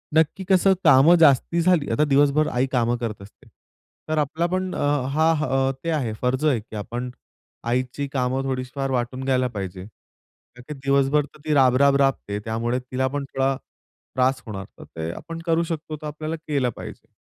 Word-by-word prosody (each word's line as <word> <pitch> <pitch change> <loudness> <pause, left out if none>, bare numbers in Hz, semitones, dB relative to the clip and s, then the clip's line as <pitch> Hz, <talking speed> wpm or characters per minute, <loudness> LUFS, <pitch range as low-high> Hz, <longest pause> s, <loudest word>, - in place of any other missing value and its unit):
नक्की 160 +4 +2
कसं 190 0 +5
कामं 150 +2 +7
जास्ती 160 +2 +4
झाली 170 -4 +2
आता 150 - +2
दिवसभर 145 +1 +3
आई 125 +2 +1
कामं 120 -1 +1
करत 115 -4 -5
असते, 100 - -16 0.6
तर 155 - 0
आपला 155 +3 0
पण 185 0 -1
अ, - - -4 0.3
हा 150 -4 +2
ते 165 - -2
आहे 135 -9 -1
फर्ज 130 +4 0
आहे, 140 -6 +3
की 110 +1 -12
आपण 120 +4 -4 0.6
आईची 130 +3 -1
कामं 130 0 0
थोडीशी 130 -1 -3
फार 135 -1 -2
वाटून 130 +1 -2
घ्यायला 130 -1 +1
पाहिजे. 95 -5 -6 0.7
का 125 - -12
की 150 - -5
दिवसभर 140 +1 +1
तर 145 - -19
ती 155 - +1
राब-राब 135 0 +4
राबते, 130 -7 0
त्यामुळे 115 +2 -1
तिला 130 +1 -2
पण 140 +1 -3
थोडा 135 0 -1 0.6
त्रास 130 +1 +2
होणार. 100 -4 -6
तर - - -9
ते 80 +1 -6
आपण 165 0 -8
करू 165 0 +2
शकतो, 160 -2 -5
तर 155 0 -8
आपल्याला 155 +2 -4
केलं 140 -5 +1
पाहिजे. - - -10
135 Hz, 180 wpm, -23 LUFS, 125-155 Hz, 0.7 s, कामं